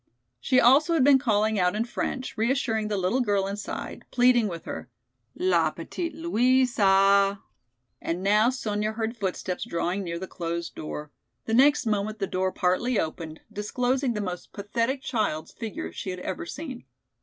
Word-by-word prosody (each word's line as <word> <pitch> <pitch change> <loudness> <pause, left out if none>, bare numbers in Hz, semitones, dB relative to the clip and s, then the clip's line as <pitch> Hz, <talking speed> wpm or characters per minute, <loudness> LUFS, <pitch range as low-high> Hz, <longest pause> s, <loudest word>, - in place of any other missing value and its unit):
She 255 - +3
also 285 +7 +5
had 295 - +4
been 275 0 +6
calling 220 -4 +1
out 180 +1 +2
in 220 +2 0
French, 255 +2 -4
reassuring 225 -2 0
the 210 -1 -1
little 190 +8 +1
girl 205 -4 +1
inside, 200 +1 -5
pleading 245 -2 +4
with 170 -4 -6
her. - - -6 0.5
"La 170 -3 +2
petite 310 - -5
Louisa." 205 - +3 0.6
And 175 +3 -3
now 210 +4 +4
Sonya 215 -4 -2
heard 225 +1 -3
footsteps 190 -3 -3
drawing 175 +3 -2
near 170 -2 -4
the 185 - -5
closed 170 -1 -4
door. 150 -1 -6 0.3
The 225 - -2
next 275 +3 +5
moment 215 0 -1
the 200 - -1
door 185 0 -1
partly 200 +7 +1
opened, 160 0 -4
disclosing 250 +5 0
the 210 - -1
most 180 -3 -6
pathetic 230 +6 -2
child's 200 -10 -1
figure 195 - -6
she 85 - -6
had 180 0 -4
ever 170 - -4
seen. 265 - -7
210 Hz, 160 wpm, -26 LUFS, 185-245 Hz, 0.6 s, been